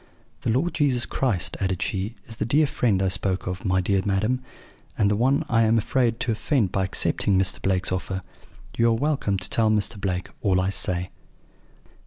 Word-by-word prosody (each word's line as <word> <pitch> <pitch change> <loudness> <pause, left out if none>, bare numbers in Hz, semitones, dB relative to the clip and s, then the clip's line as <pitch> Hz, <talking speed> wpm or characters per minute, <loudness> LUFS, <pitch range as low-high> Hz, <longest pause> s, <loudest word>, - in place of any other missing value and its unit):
"'The - - -2
Lord 140 +9 +1
Jesus 130 -5 +2
Christ,' 115 -10 -1
added 95 -2 -1
she, 100 +4 -2
'is 115 - -8
the - - -1
dear 145 +7 +3
Friend 115 -8 +1
I - - +2
spoke 95 +1 0
of, 90 +1 -4
my 95 -1 +2
dear 95 +1 +1
madam, 110 +6 0 0.6
and 105 -1 +3
the - - +2
One 135 +7 +2
I 115 -4 +3
am 115 0 +3
afraid 115 +1 +1
to 120 - 0
offend 110 - 0
by 95 - 0
accepting 95 +1 +1
Mr. 95 0 +1
Blake's 95 -1 0
offer. 95 0 -3 0.5
You 115 - +3
are - - +3
welcome 125 -5 0
to 95 - -1
tell 110 -1 +2
Mr. 105 -1 0
Blake 90 -2 -2
all 95 -2 +2
I 95 +1 0
say.' 90 -2 -2
105 Hz, 195 wpm, -24 LUFS, 95-120 Hz, 0.6 s, dear